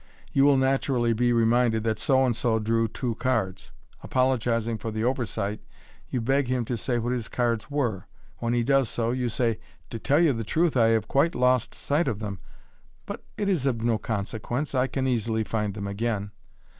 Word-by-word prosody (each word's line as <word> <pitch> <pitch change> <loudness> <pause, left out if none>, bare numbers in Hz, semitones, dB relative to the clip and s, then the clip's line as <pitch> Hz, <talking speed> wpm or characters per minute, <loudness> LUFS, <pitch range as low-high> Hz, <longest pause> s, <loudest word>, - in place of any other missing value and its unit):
You 135 0 +5
will 140 -1 +5
naturally 130 -3 +2
be 120 +2 +2
re 115 -1 +3
minded 115 -1 +2
that 110 -1 -1
So 135 -1 +3
and 120 -3 +1
so 115 -1 +1
drew 115 +1 +1
two 120 +2 -3
cirds. 110 -7 -1 0.3
Apologizing 115 -3 0
for 115 - -4
the 110 0 -3
over 125 -1 0
sight, 100 +2 -3 0.5
you 125 - -1
beg 135 +3 +1
him 125 -1 0
to 120 - -2
say 120 +2 -1
what 120 +1 -1
his 120 -3 -3
cards 120 0 -1
were. 120 -9 -1 0.3
When 120 0 -1
he 120 - +2
does 135 -1 +2
%o, 115 0 +1
you 125 -1 -1
say, 115 -2 0 0.3
"To 115 - -4
tell 145 +6 +2
you 165 -5 +4
the 115 -1 -3
truth 160 +7 +1
I 115 -3 +5
have 110 -2 +2
quite 150 +5 +2
lost 125 -1 +2
sight 150 +4 0
of 105 - -1
them 105 -3 -5
j - - -22 0.6
but - - -7
it 205 - -1
is 170 -9 +1
of 115 -4 -1
no 115 -2 +1
consequence, 115 +7 -3
I 130 0 +2
can 135 0 -2
easily 115 -3 0
find 105 -2 -2
them 100 -2 -4
aerain." 100 0 -2
120 Hz, 205 wpm, -26 LUFS, 110-130 Hz, 0.6 s, You